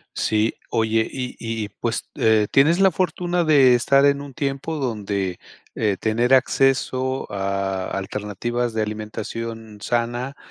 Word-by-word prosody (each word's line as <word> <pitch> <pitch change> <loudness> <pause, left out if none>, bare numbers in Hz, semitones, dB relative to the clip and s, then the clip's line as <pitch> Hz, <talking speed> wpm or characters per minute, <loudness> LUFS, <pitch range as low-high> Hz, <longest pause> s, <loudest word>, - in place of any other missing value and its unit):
Sí. 110 +1 +1 0.2
Oye, 110 0 +1
y 125 -1 -5
y 115 -2 -3
pues, 115 -1 -1
eh, 110 -1 +3
tienes 155 +7 +4
la 195 -1 +6
fortuna 180 0 0
de 140 -5 +6
estar 135 +3 +4
en 140 0 +3
un 140 -2 -9
tiempo 140 +2 -3
donde, 100 - -2 0.4
eh, 105 -3 0
tener 120 +4 +2
acceso 130 0 +1
a 95 -1 -2
alternativas 105 +4 -3
de 110 - 0
alimentación 110 +1 -6
sana, 120 +4 -2
115 Hz, 130 wpm, -22 LUFS, 105-135 Hz, 0.4 s, la